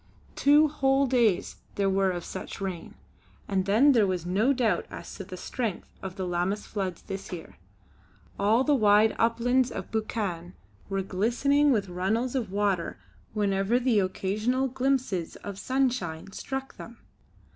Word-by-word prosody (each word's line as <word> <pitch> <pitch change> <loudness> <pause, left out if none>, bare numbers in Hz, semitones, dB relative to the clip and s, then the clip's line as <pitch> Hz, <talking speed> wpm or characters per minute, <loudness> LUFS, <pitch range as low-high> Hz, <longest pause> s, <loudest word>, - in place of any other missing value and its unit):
Two 295 +2 +5
whole 275 -2 +2
days 235 -8 +1 0.2
there 200 -1 +1
were 195 0 +2
of 175 -2 -3
such - - -7
rain, 185 -4 -5 0.5
and 190 -2 0
then 235 +9 +5
there 225 -6 +4
was 180 -3 -2
no 200 +9 +2
doubt 250 -4 +1
as - - -8
to - - -7
the - - -9
strength 230 -8 -4
of 190 -1 -6
the 190 -2 -3
Lammas 180 +4 -1
floods 190 -4 -4
this 195 0 -7
year. 175 -3 -8 0.8
All 215 +5 +3
the 295 - +3
wide 215 -3 +4
uplands 240 +3 +2
of - - -6
Buchan 195 -5 -3 0.3
were 195 -1 -1
glistening 245 +10 +2
with 205 -5 +1
runnels 195 +8 -1
of 235 -8 -2
water 200 -3 0 0.4
whenever 200 +1 +1
the 245 -4 +2
occasional 210 +7 0
glimpses 255 -9 -1
of 200 -1 -8
sunshine 235 -11 -1
struck 270 +5 -5
them. 230 0 -10
210 Hz, 150 wpm, -27 LUFS, 190-255 Hz, 0.8 s, Two